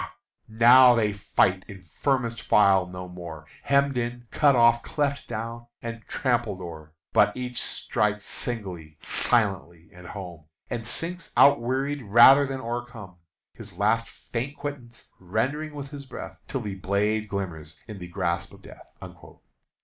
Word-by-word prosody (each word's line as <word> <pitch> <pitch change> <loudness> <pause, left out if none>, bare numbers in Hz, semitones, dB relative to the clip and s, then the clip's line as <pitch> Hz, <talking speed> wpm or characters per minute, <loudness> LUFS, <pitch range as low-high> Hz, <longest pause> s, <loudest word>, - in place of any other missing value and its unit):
now 120 +3 +7
they 105 -3 +1
fight 95 -1 +1
in 95 -3 -11
firmest 120 - -1
file 95 -3 +4
no 90 0 -8
more, 85 -3 -9 0.2
Hemmed 140 -1 +2
in 120 0 -4
cut 145 -3 +4
off 120 0 +5
cleft 140 -1 -2
down 115 +1 -6
and 115 0 -6
trampled 120 -7 -1
o'er, 80 -3 -10 0.2
But - - +4
each 125 -1 -3
strikes 105 -1 -1
singly, 90 -10 -5
silently, 95 -8 0
and 90 0 -12
home, 90 -6 -9 0.3
And 115 -1 -4
sinks 175 +6 -4
outwearied 140 +1 +3
rather 120 +7 +7
than 135 -1 -4
o'ercome, 115 -6 -6 0.4
His - - -11
last 110 +3 +1
faint 130 +5 -6
quittance 130 -6 -7
rendering 135 - -2
with 140 -1 -7
his 140 -2 -9
breath, 130 - -9
Till 135 - -3
the 105 -3 -5
blade 105 +3 -1
glimmers 85 -6 -5
in 105 -3 -8
the 90 - -8
grasp 85 -1 -2
of - - -16
death." - - -14
115 Hz, 140 wpm, -26 LUFS, 95-125 Hz, 0.4 s, now